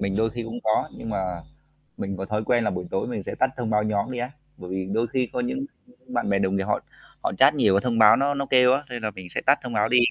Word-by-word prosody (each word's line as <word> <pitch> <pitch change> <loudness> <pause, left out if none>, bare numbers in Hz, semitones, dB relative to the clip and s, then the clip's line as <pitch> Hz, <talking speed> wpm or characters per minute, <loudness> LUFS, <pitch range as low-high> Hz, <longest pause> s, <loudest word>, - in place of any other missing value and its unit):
mình 100 0 -1
đôi 110 +1 +2
khi 120 -1 -5
cũng 115 +1 -6
có, 110 0 +2
nhưng 115 - -6
mà 95 -4 -2 0.6
mình 100 -1 -4
có 95 - -4
thói 105 +2 -2
quen 120 0 +2
là 105 - +1
buổi 90 0 -4
tối 95 - -1
mình 105 -5 -4
sẽ - - -4
tắt 130 - +3
thông 120 -3 -2
báo 105 -1 +2
nhóm 110 +3 -1
đi 125 - -4
á. 125 +2 -3 0.3
Bởi 90 - -9
vì 95 0 -2
đôi 115 +2 +1
khi 125 +2 -1
có 250 - -1
những 250 +3 -2 0.4
bạn 255 - -2
bè 100 -1 +2
đồng 95 0 +1
nghiệp 95 - 0
họ 105 +1 0 0.4
họ - - 0
chat - - +7
nhiều 100 - +3
cái 100 - +3
thông 115 -2 0
báo 105 -2 +8
nó 140 +1 +1
nó 140 0 -2
kêu 125 0 +6
á, 145 +2 0
nên 120 -2 -6
là 105 - -1
mình 95 -2 -10
sẽ - - 0
tắt 140 +2 +5
thông 125 -2 -5
báo 105 0 +2
đi. 125 - +4
110 Hz, 305 wpm, -25 LUFS, 100-125 Hz, 0.6 s, báo